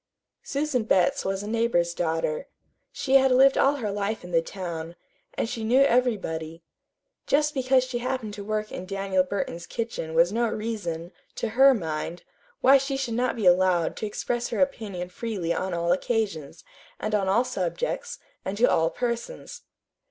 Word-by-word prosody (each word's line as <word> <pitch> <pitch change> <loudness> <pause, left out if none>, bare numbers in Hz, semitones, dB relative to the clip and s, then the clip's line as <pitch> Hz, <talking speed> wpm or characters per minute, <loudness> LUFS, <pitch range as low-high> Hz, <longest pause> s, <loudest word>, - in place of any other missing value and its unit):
Susan 280 -4 -1
Betts 185 -4 +2
was 195 +1 -2
a - - -6
neighbor's 220 -7 +1
daughter. 165 - -1 0.4
She 270 0 +3
had 265 0 +4
lived 270 +2 +6
all 275 +1 +3
her 220 -7 -3
life 205 +1 -2
in 180 - -9
the 165 -1 +3
town, 170 -2 -6 0.4
and - - -1
she 225 -1 -4
knew 245 +5 +4
everybody. 190 - 0 0.6
Just 295 +1 +2
because 260 -2 +3
she 255 -1 -3
happened 250 -4 -3
to 205 -1 -7
work 215 +1 -2
in 185 - -6
Daniel 195 -1 0
Burton's 180 -3 -4
kitchen 225 -9 -4
was 170 +4 +4
no 235 0 +1
reason, 205 -7 -4 0.2
to 230 - -2
her 265 +4 +6
mind, 165 -2 -4 0.4
why 270 +1 +7
she 270 0 -2
should 265 -4 -2
not 245 +2 0
be 220 -4 -3
allowed 180 -1 +4
to 215 - -3
express 240 +3 -2
her - - -3
opinion 210 -10 -1
freely 185 -4 -3
on 185 +2 -2
all 170 0 0
occasions, 185 -6 -1 0.4
and 215 - -3
on 200 -2 +1
all 225 +6 +4
subjects, 250 - -3 0.3
and 190 +2 -4
to 235 - +5
all 165 -7 +3
persons. 240 - -4
215 Hz, 170 wpm, -26 LUFS, 175-250 Hz, 0.6 s, why